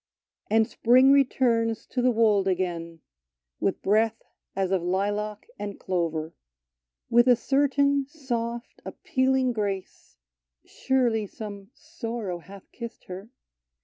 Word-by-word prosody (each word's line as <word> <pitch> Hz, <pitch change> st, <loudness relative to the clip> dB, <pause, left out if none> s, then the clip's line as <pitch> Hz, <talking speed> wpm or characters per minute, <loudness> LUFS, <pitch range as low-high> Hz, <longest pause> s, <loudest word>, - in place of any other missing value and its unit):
And 220 Hz, +1 st, +3 dB
spring 255 Hz, +3 st, +5 dB
returns 235 Hz, -5 st, +2 dB
to 250 Hz, -, 0 dB
the 250 Hz, -, +4 dB
wold 215 Hz, -4 st, +3 dB
again, 170 Hz, -3 st, -2 dB, 0.6 s
With -, -, -1 dB
breath 220 Hz, +2 st, +2 dB, 0.3 s
as 195 Hz, -1 st, 0 dB
of 190 Hz, -2 st, +2 dB
lilac 205 Hz, +4 st, -2 dB
and 205 Hz, 0 st, -5 dB
clover. 165 Hz, -3 st, -2 dB, 0.8 s
With 240 Hz, +1 st, +5 dB
a 250 Hz, -, +7 dB
certain 280 Hz, +2 st, +2 dB
soft, 240 Hz, -5 st, -5 dB
appealing 260 Hz, -1 st, 0 dB
grace 200 Hz, -, -4 dB, 0.5 s
(Surely 240 Hz, -5 st, 0 dB
some 200 Hz, -1 st, -8 dB
sorrow 230 Hz, -, -5 dB
hath 195 Hz, +3 st, -14 dB
kissed 235 Hz, -1 st, -8 dB
her 190 Hz, +4 st, -9 dB
225 Hz, 115 wpm, -26 LUFS, 195-250 Hz, 0.8 s, a